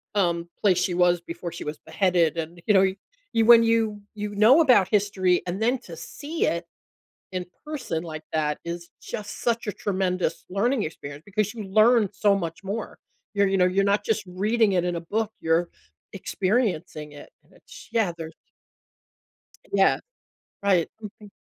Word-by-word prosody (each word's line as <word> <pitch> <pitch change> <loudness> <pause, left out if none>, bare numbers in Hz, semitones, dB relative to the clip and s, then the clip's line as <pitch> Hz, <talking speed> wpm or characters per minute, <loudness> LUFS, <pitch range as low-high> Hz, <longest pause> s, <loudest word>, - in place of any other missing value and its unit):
um, 170 -4 +1
place 190 -4 +4
she 180 0 0
was 175 0 +3
before 170 +1 -7
she - - -7
was 150 0 -5
beheaded, 175 -4 +2
and, 165 +1 -5
you 210 - +5
know, 190 0 +6 0.5
you 225 -1 +3
when 235 0 +9
you 225 -2 +1
you 210 -1 -5
know 230 +10 +6
about 245 - +5
history, 190 -3 +2
and 180 +4 -3
then 245 +3 +2
to 170 -9 -11
see 290 - -3
it 170 +1 -1 0.7
in 180 -1 -3 0.2
person 275 - -4
like 155 -2 -7
that 150 -1 0
is 170 0 -6
just 205 -1 -7
such 235 -2 0
a 210 - -1
tremendous 185 -4 -1
learning 220 +5 +1
experience 145 -1 -7
because 205 0 -1
you 225 -3 -6
learn 215 +3 +4
so 205 +1 +3
much 170 -1 -4
more. 205 +3 -5 0.4
You're 200 -1 +3
you 195 0 +1
know, 180 - +4
you're 185 +2 +2
not 200 +1 +1
just 220 -1 0
reading 210 +4 +1
it 180 -1 +1
in 175 -1 -1
a 170 - -3
book, 215 +5 -2
you're 165 +1 +1 0.4
experiencing 185 -8 -1
it, 145 - -12
and - - -29
it's - - -15
yeah, 215 -7 +1
there's 160 -1 -8 1.4
Yeah. - - +4 0.6
Right. 185 -4 +3
Mhm. 210 0 -10
195 Hz, 170 wpm, -25 LUFS, 170-215 Hz, 1.4 s, when